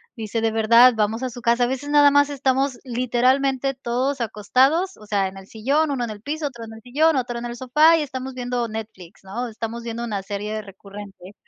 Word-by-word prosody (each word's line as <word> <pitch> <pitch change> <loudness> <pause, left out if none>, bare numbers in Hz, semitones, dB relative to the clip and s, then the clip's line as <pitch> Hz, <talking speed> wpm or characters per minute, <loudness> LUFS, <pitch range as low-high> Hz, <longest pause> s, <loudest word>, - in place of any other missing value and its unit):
Dice: 225 0 -3
“De 225 0 +1
verdad, 230 +3 +6
vamos 220 +3 -1
a 255 - -1
su 245 0 -10
casa. 235 +1 +2
A - - -1
veces 265 +3 -4
nada 290 -1 +6
más 285 0 +3
estamos 270 -2 0
literalmente 255 +2 +1
todos 260 +2 -2
acostados, 265 - +1
o 215 - -15
sea, 200 -2 +1
en 190 - -9
el 195 - -11
sillón, 280 +9 0
1 245 -3 -1
en - - -7
el 210 -1 -8
piso, 300 +4 -3
otro 235 -4 -9
en 225 - -9
el 220 - -12
sillón, 290 +6 +2
otro 245 -2 -2
en 240 - -6
el 240 0 -7
sofá, 305 +6 +4
y - - 0
estamos 265 -1 -6
viendo 245 -1 -2
Netflix, 210 -4 -9
¿no? 235 +6 -4
Estamos 230 +1 -6
viendo 235 0 -4
una 200 -4 -4
serie 210 +2 -4
recurrente. 200 -1 -12
240 Hz, 220 wpm, -22 LUFS, 220-270 Hz, -, verdad